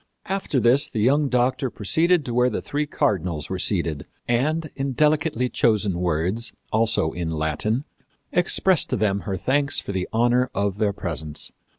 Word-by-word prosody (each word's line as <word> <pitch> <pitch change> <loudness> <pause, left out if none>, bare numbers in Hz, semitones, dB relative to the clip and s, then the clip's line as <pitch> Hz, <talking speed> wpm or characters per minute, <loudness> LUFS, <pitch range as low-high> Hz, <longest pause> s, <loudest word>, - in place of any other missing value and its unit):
After 190 -8 -1
this 125 +5 +4
the 110 - -4
young 140 +6 +3
doctor 130 +1 +1
proceeded 160 - +2
to 120 - -4
where 125 +1 +3
the - - -3
three 150 +1 -3
cardinals 90 - -1
were 95 - -2
seated, 85 -7 0 0.2
and 155 +6 0
in 135 0 -2
delicately 150 -3 +1
chosen 105 -7 +1
words, 90 +7 -1 0.2
also 110 -7 +2
in 85 -2 -4
Latin, 80 - -1 0.5
expressed 180 0 +2
to - - 0
them 100 -3 +1
her 95 - -1
thanks 140 +7 +1
for - - -6
the 95 -2 -3
honor 120 +2 +2
of 100 0 -1
their 105 -2 +2
presence. 80 -6 -4
115 Hz, 165 wpm, -23 LUFS, 95-140 Hz, 0.5 s, this